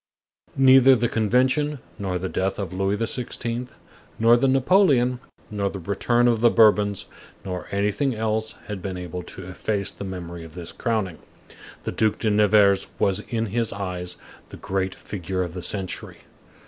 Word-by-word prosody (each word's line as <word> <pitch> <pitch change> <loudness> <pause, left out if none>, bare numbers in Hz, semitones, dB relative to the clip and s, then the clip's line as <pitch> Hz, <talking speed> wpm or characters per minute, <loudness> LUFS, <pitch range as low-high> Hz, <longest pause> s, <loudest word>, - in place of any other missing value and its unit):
Neither 135 0 +7
the 120 0 +1
Convention, 130 +7 +1 0.2
nor 95 -3 -2
the 90 +1 -3
death 95 +1 -1
of 95 -3 -4
Louis 95 +2 0
XVI., 120 +1 -3 0.5
nor 115 +1 +6
the 120 +3 +2
Napoleon, 130 -3 +3 0.3
nor 100 -1 -1
the 100 - -6
return 110 +7 +1
of 115 -2 +2
the 120 - +6
Bourbons, 105 -3 +4 0.4
nor 90 -2 -5
anything 105 +7 0
else 110 0 -1
had 105 -3 -6
been 95 -1 -4
able 90 0 -5
to 95 +1 -10
efface 100 +2 -2
the - - -9
memory 85 -3 -6
of 80 0 -12
this 85 -2 -7
crowning. 110 -8 -2 0.6
The - - -3
Duc 110 -1 +1
de 110 - 0
Nevers 105 -1 +4
was, 95 0 +2
in 115 -1 -1
his 115 -1 +1
eyes, 90 -3 -4 0.3
the - - -10
great 95 0 -2
figure 95 -1 -4
of 85 -2 -6
the 90 - -6
century. 95 0 -5
105 Hz, 160 wpm, -24 LUFS, 95-120 Hz, 0.6 s, Neither